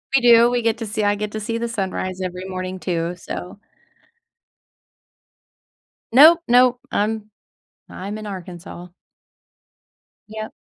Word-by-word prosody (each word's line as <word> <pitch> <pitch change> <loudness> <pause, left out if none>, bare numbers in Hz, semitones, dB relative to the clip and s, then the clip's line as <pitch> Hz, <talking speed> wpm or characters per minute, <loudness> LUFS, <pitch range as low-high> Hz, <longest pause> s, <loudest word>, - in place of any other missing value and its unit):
We 270 - +4
do, 235 0 +6
we 245 0 0
get 225 -1 +1
to 225 - -4
see 210 +1 -2
I 205 0 +2
get 210 0 -4
to 215 - -3
see 230 +2 -3
the 235 - -2
sunrise 190 -4 -3
every 185 0 -5
morning, 185 0 -5
too, 170 -2 -2
so 180 +2 -8 2.5
Nope, 315 +7 +8
nope. 245 0 +4
I'm 215 0 -1 0.6
I'm 200 +3 -6
in 215 -1 -7
Arkansas. 180 -2 -9 1.4
Yep. 215 0 -7
210 Hz, 130 wpm, -21 LUFS, 185-230 Hz, 2.5 s, Nope